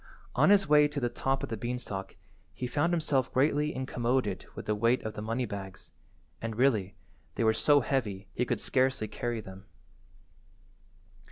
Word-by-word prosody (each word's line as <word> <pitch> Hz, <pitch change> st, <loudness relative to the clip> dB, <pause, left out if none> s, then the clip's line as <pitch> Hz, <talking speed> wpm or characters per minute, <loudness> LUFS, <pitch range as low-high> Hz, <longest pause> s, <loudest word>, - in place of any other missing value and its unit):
On -, -, +4 dB
his 200 Hz, -3 st, +5 dB
way 150 Hz, 0 st, +6 dB
to 150 Hz, -1 st, -4 dB
the 120 Hz, -2 st, 0 dB
top 135 Hz, +3 st, -1 dB
of -, -, -3 dB
the 115 Hz, -, -3 dB
beanstalk 110 Hz, -4 st, -4 dB, 0.4 s
he 125 Hz, -, -4 dB
found 145 Hz, +7 st, +1 dB
himself 145 Hz, -6 st, +1 dB
greatly 150 Hz, +3 st, +2 dB
incommoded 125 Hz, -5 st, -1 dB
with -, -, -7 dB
the 105 Hz, -, +1 dB
weight 115 Hz, +4 st, +2 dB
of 110 Hz, -, -4 dB
the 105 Hz, -, -6 dB
money 115 Hz, +4 st, -1 dB
bags, 95 Hz, -3 st, -8 dB, 0.5 s
and, 115 Hz, -1 st, -4 dB
really, 110 Hz, -6 st, +2 dB, 0.4 s
they -, -, 0 dB
were 110 Hz, 0 st, +4 dB
so 145 Hz, +5 st, +4 dB
heavy 105 Hz, -7 st, -2 dB
he 125 Hz, -, 0 dB
could -, -, -1 dB
scarcely 130 Hz, -4 st, +1 dB
carry 115 Hz, +2 st, -3 dB
them. 95 Hz, 0 st, -11 dB
120 Hz, 170 wpm, -30 LUFS, 105-135 Hz, 0.5 s, way